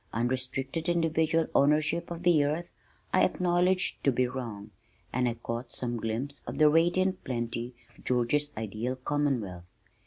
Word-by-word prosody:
Unrestricted 130 +7 -2
individual 165 -1 +2
ownership 155 +4 +2
of 170 0 -6
the 170 -5 +5
earth 155 +4 -1 0.5
I - - +5
acknowledged 180 +1 +1
to 140 - +4
be 125 0 +1
wrong 115 -5 -6 0.4
and 125 0 +2
I 115 - -3
caught 115 +1 -5
some 120 -1 -3
glimpse 115 +6 -3
of - - -5
the 155 -1 +6
radiant 175 +4 +2
plenty 120 0 -3 0.2
of - - -19
George's 130 +4 +1
ideal 110 +4 -3
Commonwealth. 130 -10 -1
135 Hz, 145 wpm, -29 LUFS, 120-165 Hz, 0.5 s, the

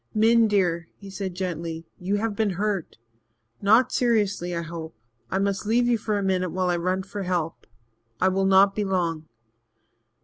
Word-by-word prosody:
"Min, 225 +1 +5
dear," 175 -5 +1
he 200 -1 -11
said 190 -2 -5
gently, 165 -3 -4
"you 190 +2 -1
have 210 0 -1
been 215 0 +1
hurt 205 -4 -2 0.6
not 220 +5 +4
seriously, 205 -7 +1
I 170 - -2
hope. 165 -3 -7 0.3
I 190 - -1
must 200 +1 -1
leave 240 +2 +3
you 240 -2 +2
for 215 -1 -1
a 200 - -1
minute 185 -1 0
while 180 +1 0
I 175 - +1
run 185 +2 -1
for 200 +1 -6
help 175 -3 -3 0.5
I 185 - +3
will 190 +1 +1
not 195 +1 +5
be 210 - -1
long." 170 -5 -1
190 Hz, 175 wpm, -25 LUFS, 175-205 Hz, 0.6 s, Min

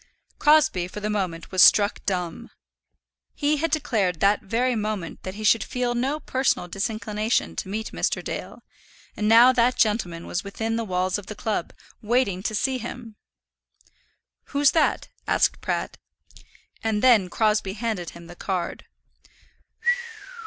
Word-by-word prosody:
Crosbie 300 - +4
for 195 - -8
the 210 +1 -2
moment 180 -5 -3
was 185 -1 +3
struck 205 0 +5
dumb. 180 -4 -3 0.9
He 295 +1 +1
had 330 +3 0
declared 225 - 0
that 200 +1 +3
very 245 +5 0
moment 210 -5 -4
that 185 +1 -7
he 215 - -7
should 215 0 +4
feel 250 -1 -2
no 265 +5 -1
personal 260 -9 0
disinclination 215 +3 -2
to 190 - -4
meet 220 +2 -4
Mr. - - -1
Dale, - - -6 0.5
and 210 - -1
now 230 +3 +8
that 245 0 +2
gentleman 185 -6 0
was 175 - -3
within 225 +3 -3
the 230 - -1
walls 185 -1 -1
of 200 - -13
the 215 - -7
club, 210 -4 -2 0.3
waiting 220 -4 +1
to 215 +2 -2
see 260 +4 0
him! 235 -1 -8 1.3
"Who's 285 -1 +3
that?" 320 -2 +1 0.2
asked - - +2
Pratt. - - -3 0.8
And 220 -1 0
then 225 -8 +5
Crosbie 210 -1 +1
handed 215 -5 -3
him 170 0 -12
the 175 +1 -12
card. 180 -2 -4
215 Hz, 145 wpm, -24 LUFS, 190-245 Hz, 1.3 s, now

